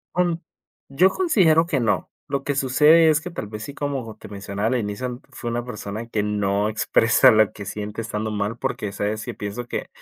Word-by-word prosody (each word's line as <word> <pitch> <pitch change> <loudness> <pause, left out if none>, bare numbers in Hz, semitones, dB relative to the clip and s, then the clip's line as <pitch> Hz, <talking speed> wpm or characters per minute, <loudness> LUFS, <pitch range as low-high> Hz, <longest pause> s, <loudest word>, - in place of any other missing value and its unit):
Mm, 175 -2 +2 0.5
yo 180 +8 +4
considero 185 - +3
que 150 -6 0
no, 115 - 0 0.2
lo 140 -2 -2
que 145 - -1
sucede 150 +5 +5
es 150 -1 +3
que 180 - -6
tal 165 -11 -6
vez 105 0 -7
sí, 140 - -7
como 135 -7 -4
te - - -11
mencionaba 100 +1 -3
al 130 - +1
inicio, 120 +4 -4
fue 120 - -5
una 120 +1 -2
persona 110 -1 -6
que 110 -3 -1
no 105 0 0
expresa 115 +1 +4
lo 110 -1 +4
que 100 - -8
siente 105 +3 -5
estando 110 -1 -3
mal, 105 +2 -2
porque, 105 -3 -3
¿sabes?, 105 +2 -3
yo - - -6
pienso 110 +4 -5
que, - - -4
115 Hz, 205 wpm, -23 LUFS, 105-140 Hz, 0.5 s, sucede